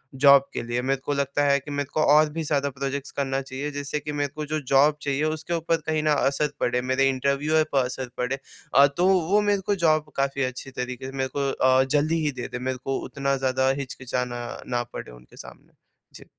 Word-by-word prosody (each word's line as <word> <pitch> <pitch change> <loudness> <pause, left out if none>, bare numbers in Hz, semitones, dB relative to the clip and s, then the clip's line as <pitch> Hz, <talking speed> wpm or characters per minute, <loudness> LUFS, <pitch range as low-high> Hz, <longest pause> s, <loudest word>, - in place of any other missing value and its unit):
Job 140 0 +7
के - - -2
लिए। 120 +1 -2
मेरे 135 +1 0
को 145 - 0
लगता 140 +1 0
है 140 0 +4
कि 145 +2 -10
मेरे 145 -1 -2
को 155 - +1
और 155 0 +5
भी 160 +2 -4
ज़्यादा 145 -2 0
प्रोजेक्ट्स 140 +1 -4
करना 135 -1 -1
चाहिए, 135 +2 -5
जिससे 145 +1 -3
कि 150 +1 -6
मेरे 145 -1 -1
को 155 0 -4
जो 155 +1 -2
जॉब 145 +2 +5
चाहिए, 140 +1 -1
उसके 155 +2 -2
ऊपर 165 0 +1
कहीं 155 -1 0
न - - 0 0.2
असर 140 +2 0
पड़े, 125 0 +1
मेरे 130 +2 +2
इंटरव्यूवर 140 +4 +1
पर 135 -2 +3
असर 125 0 -5
पड़े 125 +2 -1 0.4
अ, 140 - +8
तो 180 +1 +3 0.2
वो 205 +2 +4
मेरे 205 -1 +1
को - - +3
जॉब 155 -1 +2
काफ़ी 140 0 0
अच्छी 130 +1 -5
तरीके 125 0 -5
से 130 - -5
मेरे 130 0 -1
को 140 -1 +1
अ, 130 0 +4
जल्दी 150 +4 +1
ही 145 - +1
दे - - -4
दे, 125 - -4
मेरे 130 +1 -2
को 135 0 -1
उतना 140 0 -1
ज़्यादा 130 0 +1
हिचकिचाना 125 -2 -4 0.2
ना 120 -1 -1
पड़े - - -7
उनके - - -16
सामने। - - -13 0.4
जी। - - -12
140 Hz, 225 wpm, -25 LUFS, 130-150 Hz, 0.4 s, अ